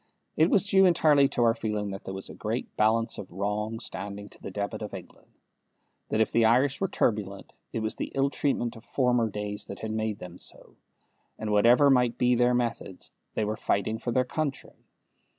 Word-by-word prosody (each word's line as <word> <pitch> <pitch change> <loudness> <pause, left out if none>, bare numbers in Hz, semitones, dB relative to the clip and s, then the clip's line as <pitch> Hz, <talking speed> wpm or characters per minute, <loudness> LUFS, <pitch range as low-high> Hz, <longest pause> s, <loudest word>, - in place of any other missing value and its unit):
It 160 +3 +4
was 200 - +3
due 195 -1 +5
entirely 150 -5 +5
to 120 - 0
our 115 -1 +5
feeling 105 -2 -3
that 95 - -8
there 95 - -5
was 95 - -7
a - - -9
great - - -4
balance 115 +1 +1
of 95 - -8
wrong 105 +4 -2
standing 100 -2 -6
to - - -17
the - - -6
debit 100 +3 -4
of 105 -2 -5
England; 90 - -12 0.8
that 110 - 0
if 110 - +2
the 115 - +3
Irish 130 +6 +3
were 195 - +2
turbulent, 100 - -1 0.2
it 115 - -3
was 110 0 -1
the - - -4
ill 135 0 +2
treatment 120 -5 -1
of 115 - -12
former 125 -3 +1
days 105 0 -5
that 100 - -7
had 110 - -3
made 110 -1 -2
them 90 0 -10
so; - - -11 0.6
and 110 - -4
that, - - 0
whatever 120 +7 +6
might 125 -2 +3
be 125 0 +3
their 125 0 +3
methods, 120 -6 -3 0.2
they 110 - 0
were 105 +1 -2
fighting 110 +1 -1
for 120 - -3
their 125 +1 +2
country. 140 0 -3
110 Hz, 205 wpm, -27 LUFS, 105-125 Hz, 0.8 s, whatever